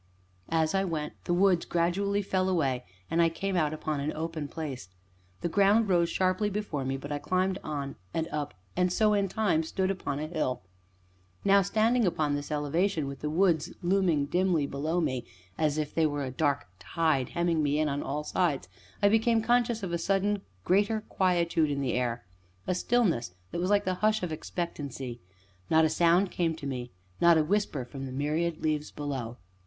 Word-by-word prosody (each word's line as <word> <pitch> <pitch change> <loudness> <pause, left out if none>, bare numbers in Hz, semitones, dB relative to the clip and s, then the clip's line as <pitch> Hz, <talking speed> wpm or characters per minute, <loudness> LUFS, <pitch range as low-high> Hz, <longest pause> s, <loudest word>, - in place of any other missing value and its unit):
As 160 0 +1
I 195 0 +2
went, 160 -5 -3
the 175 - +1
woods 185 -2 +4
gradually 200 +4 0
fell 185 -1 0
away, 135 -8 0 0.3
and 170 - +3
I 165 - +5
came 195 +3 -3
out 155 -4 +2
upon 155 -1 -3
an 145 +2 -1
open 160 -2 -4
place. 140 - -6 0.5
The - - 0
ground 200 +4 +3
rose 170 -2 +3
sharply 185 +3 +1
before 200 -9 -3
me, 135 +1 -2
but 145 +2 -8
I 145 - -1
climbed 185 +4 0
on 140 -3 -4 0.2
and 160 0 -1
up 145 -4 -4 0.2
and 180 0 +2
so, 215 +3 +3
in 200 -1 +2
time, 195 -5 +1
stood 185 +4 -1
upon 145 -7 -3
a 150 - -3
hill. 150 - -2 0.8
Now, 200 0 +6
standing 220 +3 +2
upon 155 -4 0
this 145 0 -3
elevation, 155 +3 0
with 140 -1 -6
the 150 - -2
woods 170 -1 +2
looming 175 -5 +2
dimly 175 -1 +1
below 155 +5 -1
me, 130 -6 -1 0.3
as 150 +3 +1
if 150 -1 -2
they 160 -1 +3
were 145 -1 -2
a 130 - -4
dark 145 +1 0
tide 145 - 0
hemming 170 -2 +2
me 145 0 +1
in 155 0 +2
on 140 0 -1
all 150 +2 -3
sides, 150 - 0 0.4
I - - +7
became 225 +1 +3
conscious 240 -2 +2
of 175 -3 -3
a 170 - 0
sudden 200 +3 +1 0.2
great 200 +3 +3 0.2
quietude 170 -4 +2
in 140 -1 -1
the 130 -3 0
air 120 -1 -1 0.4
a - - 0
stillness 180 - +1 0.2
that - - -3
was 180 - 0
like 205 0 +3
the 185 - +1
hush 215 -1 +2
of 175 - -2
expectancy; 140 -7 -5 0.5
not 160 0 +5
a - - +3
sound 175 +4 +3
came 165 -2 0
to 150 - -9
me, 125 -3 -4 0.3
not 170 -1 +7
a 155 - +4
whisper 165 -7 0
from 135 +2 -7
the - - -7
myriad 155 +5 -1
leaves 155 -1 0
below. 130 -5 -5
165 Hz, 190 wpm, -29 LUFS, 145-190 Hz, 0.8 s, I